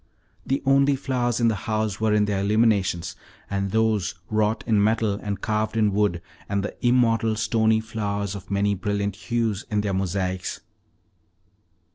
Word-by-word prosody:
The 135 Hz, -, 0 dB
only 135 Hz, +1 st, +4 dB
flowers 125 Hz, -3 st, -1 dB
in 120 Hz, -, +3 dB
the 115 Hz, -, +3 dB, 0.2 s
house 110 Hz, -1 st, -1 dB
were 110 Hz, -1 st, +2 dB
in 105 Hz, 0 st, +3 dB
their 100 Hz, -1 st, -1 dB
illuminations, 100 Hz, -4 st, +1 dB, 0.4 s
and 100 Hz, -1 st, -1 dB
those 110 Hz, -3 st, +1 dB, 0.2 s
wrought 110 Hz, 0 st, +1 dB
in 110 Hz, -3 st, +3 dB
metal 110 Hz, -1 st, +2 dB
and 100 Hz, -2 st, -3 dB
carved 110 Hz, 0 st, -1 dB
in 105 Hz, -2 st, +2 dB
wood, 100 Hz, -4 st, +1 dB, 0.3 s
and 100 Hz, -1 st, 0 dB
the 105 Hz, -, -5 dB
immortal, 115 Hz, -3 st, +3 dB
stony 110 Hz, 0 st, +2 dB
flowers 105 Hz, -3 st, -3 dB
of 100 Hz, -2 st, -9 dB
many 100 Hz, +1 st, +1 dB
brilliant 100 Hz, 0 st, -2 dB
hues 115 Hz, -1 st, -2 dB
in 105 Hz, -2 st, +1 dB
their 100 Hz, -1 st, -2 dB
mosaics. 95 Hz, 0 st, -2 dB
105 Hz, 155 wpm, -24 LUFS, 100-110 Hz, 0.4 s, only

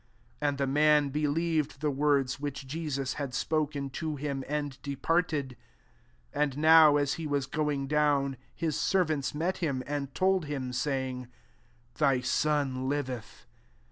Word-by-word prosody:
'' -, -, -34 dB
[And] 145 Hz, -1 st, 0 dB
the 140 Hz, -, +1 dB
man 150 Hz, +1 st, +3 dB
be^ 150 Hz, +1 st, 0 dB
lieved 160 Hz, -2 st, 0 dB
the 150 Hz, +1 st, -1 dB
words 140 Hz, -2 st, +1 dB
which 145 Hz, -1 st, -5 dB
Jesus 140 Hz, -2 st, -3 dB
had 135 Hz, -2 st, -4 dB
spoken 145 Hz, -2 st, -1 dB
to 155 Hz, +2 st, -3 dB
him, 140 Hz, -1 st, -3 dB
and 145 Hz, -2 st, -3 dB
depart 165 Hz, +5 st, 0 dB
ed. 140 Hz, -4 st, -3 dB, 0.8 s
51 -, -, -2 dB
And 140 Hz, -2 st, -2 dB
now 155 Hz, -1 st, +7 dB
as 145 Hz, 0 st, +1 dB
he 155 Hz, -, -3 dB
was 140 Hz, -2 st, 0 dB
going 145 Hz, 0 st, -1 dB
down, 145 Hz, -2 st, +2 dB, 0.2 s
his 160 Hz, -3 st, -1 dB
servants 155 Hz, -7 st, +1 dB
met 175 Hz, +5 st, -1 dB
him, 140 Hz, -7 st, -1 dB
and 140 Hz, -1 st, -3 dB
told 190 Hz, -3 st, +2 dB
Atm, 130 Hz, -4 st, -4 dB
saying, 130 Hz, -1 st, -2 dB, 0.3 s
" 120 Hz, 0 st, -35 dB
Thy 135 Hz, -4 st, +3 dB
son 135 Hz, -1 st, 0 dB
liveth." 130 Hz, -5 st, -4 dB
145 Hz, 160 wpm, -29 LUFS, 135-150 Hz, 0.8 s, now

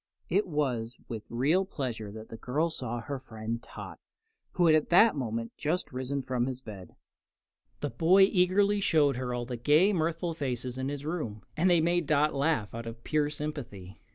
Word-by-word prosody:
It 195 Hz, +4 st, +2 dB
was 125 Hz, -7 st, -1 dB
with 110 Hz, -2 st, -6 dB
real 145 Hz, +11 st, +2 dB
pleasure 120 Hz, -, -4 dB
that 110 Hz, +1 st, -10 dB
the -, -, -7 dB
girl 150 Hz, +9 st, 0 dB
saw 120 Hz, -5 st, -4 dB
her 135 Hz, +4 st, -5 dB
friend 115 Hz, -2 st, -5 dB
Tot, -, -, -10 dB, 0.5 s
who 175 Hz, -, +3 dB
had 160 Hz, -, +6 dB
at 155 Hz, -1 st, +2 dB
that 215 Hz, +5 st, +6 dB
moment 115 Hz, -4 st, -3 dB
just 160 Hz, +4 st, -1 dB
risen 130 Hz, +2 st, -2 dB
from 125 Hz, -1 st, -1 dB
his 130 Hz, -1 st, -4 dB
bed. 100 Hz, -8 st, -10 dB, 0.9 s
The 145 Hz, -, -2 dB
boy 170 Hz, +10 st, +5 dB
eagerly 195 Hz, +2 st, +3 dB
showed 150 Hz, -8 st, +3 dB
her 125 Hz, -1 st, -3 dB
all 120 Hz, 0 st, -2 dB
the 125 Hz, 0 st, -5 dB
gay, 155 Hz, -, +4 dB
mirthful 165 Hz, 0 st, -1 dB
faces 130 Hz, -4 st, -3 dB
in 130 Hz, +1 st, -2 dB
his 145 Hz, 0 st, -5 dB
room, 135 Hz, -, -4 dB
and 175 Hz, +4 st, +3 dB
they 175 Hz, -2 st, +5 dB
made 170 Hz, -1 st, +1 dB
Dot 150 Hz, 0 st, +3 dB
laugh 140 Hz, -6 st, 0 dB
out 115 Hz, 0 st, -6 dB
of 115 Hz, 0 st, -8 dB
pure 150 Hz, -1 st, +1 dB
sympathy. 140 Hz, -11 st, -7 dB
140 Hz, 185 wpm, -29 LUFS, 120-165 Hz, 0.9 s, had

